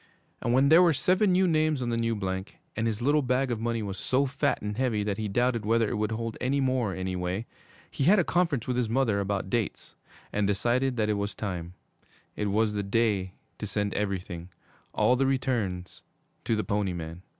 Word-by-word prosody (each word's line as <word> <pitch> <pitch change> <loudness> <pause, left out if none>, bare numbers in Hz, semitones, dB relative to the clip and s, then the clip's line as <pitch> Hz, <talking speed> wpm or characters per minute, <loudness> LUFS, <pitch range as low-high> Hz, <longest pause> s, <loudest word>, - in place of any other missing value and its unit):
And 120 - 0
when 135 +3 +4
there 165 +3 +8
were 170 -4 +4
seven 185 +8 +3
new 185 +1 +4
names 155 -3 +2
on 120 - -2
the 120 - 0
new 115 0 0
blank, 95 -1 -4 0.2
and 110 +1 0
his 110 +1 -2
little 145 +3 +3
bag 130 0 0
of 115 - -2
money 115 -1 -1
was 95 -2 -5
so 130 +8 +1
fat 140 +1 0
and 105 0 -4
heavy 115 -4 0
that 105 0 -2
he 110 - -1
doubted 120 +2 +1
whether 115 +1 +2
it - - -2
would 105 +1 -1
hold 115 0 -4
any 135 +3 +1
more, 130 -6 0
anyway, 95 +2 -3 0.5
he 135 - -1
had 200 +6 +6
a 180 - +4
conference 165 -9 +1
with 125 -1 -1
his 120 -3 0
mother 115 -4 +2
about 100 -1 -2
dates, 115 -4 -2 0.4
and 105 -1 +1
decided 120 +6 +1
that 110 -1 +1
it 105 - -1
was 100 0 -3
time 90 -4 -5 0.6
it 105 - -1
was 105 +1 +1
the 105 - -1
day 100 -2 0 0.3
to 105 - -4
send 100 +1 -1
everything 95 -4 -3 0.4
all 125 - +3
the 135 +1 +2
returns 115 -9 -1 0.4
to 115 - +1
the 110 - -1
Pony 100 -3 -1
Man. 85 0 -6
110 Hz, 210 wpm, -28 LUFS, 100-130 Hz, 0.6 s, there